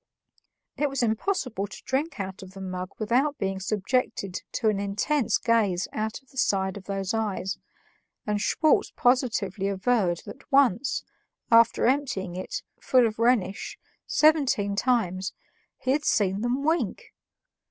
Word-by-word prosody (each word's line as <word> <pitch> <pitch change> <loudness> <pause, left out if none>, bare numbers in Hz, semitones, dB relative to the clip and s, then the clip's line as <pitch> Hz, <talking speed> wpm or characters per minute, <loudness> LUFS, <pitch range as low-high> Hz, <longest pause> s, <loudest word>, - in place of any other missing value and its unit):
It 295 0 +1
was 275 -2 -1
impossible 225 - -1
to - - -11
drink 275 +1 -2
out 190 -1 -5
of 190 0 -12
the - - -8
mug 185 -1 -4
without 255 +7 +1
being 195 -1 -2
subjected 200 -1 -1
to 225 - 0
an 205 -2 0
intense 210 +6 +1
gaze 210 -6 +1
out 220 +4 -3
of 265 - -27
the 265 - -5
side 190 -4 +1
of 200 -2 -9
these 195 0 -2
eyes, 200 -4 -2 0.7
and 210 -1 -1
Schwartz 310 +6 +2
positively 220 -6 +1
averred 195 -3 +1
that 275 - -12
once, 265 -2 +3 0.5
after 230 0 +5
emptying 235 -9 0
it, 185 - -5 0.2
full 255 -2 +4
of 220 0 -2
Rhenish, 230 -5 +1 0.3
seventeen 275 -10 +3
times, 195 -6 0 0.4
he 255 - -1
had 295 +2 +1
seen 200 -6 +1
them 245 +4 0
wink! 320 +3 -1
220 Hz, 140 wpm, -26 LUFS, 195-255 Hz, 0.7 s, after